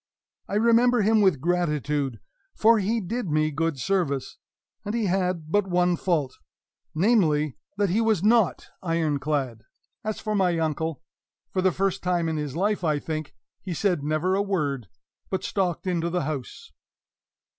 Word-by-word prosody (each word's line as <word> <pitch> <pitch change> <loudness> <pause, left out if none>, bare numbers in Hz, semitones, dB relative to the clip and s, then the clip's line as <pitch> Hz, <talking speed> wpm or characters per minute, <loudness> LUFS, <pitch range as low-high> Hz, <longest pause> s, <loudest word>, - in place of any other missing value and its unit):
I 200 - -3
remember 235 +1 +4
him 215 +1 +4
with 190 -9 +3
gratitude, 150 -7 0 0.4
for 225 0 +5
he 215 +4 0
did 220 +1 -3
me 155 0 +1
good 160 0 -1
service, 155 -6 -1 0.4
and 205 +2 -3
he 230 -2 0
had 180 -4 -1
but 205 0 +2
one 180 -1 +2
fault, 160 -7 -1 0.6
namely, 155 - +2 0.2
that 200 -3 +1
he 215 +5 +2
was 220 -5 +2
not 220 -4 +3
iron 165 -4 0
clad! 135 -6 -2 0.4
As 215 0 -3
for 215 - -3
my 185 -4 +2
uncle, 160 0 -2 0.5
for 185 - 0
the 185 0 +3
first 195 +1 -1
time 175 -2 0
in 160 -1 -1
his 150 -2 -4
life, 200 +2 0
I 155 -3 +2
think, 155 0 -5 0.3
he 180 -3 -5
said 180 -5 0
never 155 +5 0
a 195 - +2
word, 145 - -1 0.4
but 190 - -2
stalked 185 -4 -1
into 170 -2 0
the 175 -1 -1
house. 140 -3 -6
175 Hz, 160 wpm, -25 LUFS, 155-200 Hz, 0.6 s, for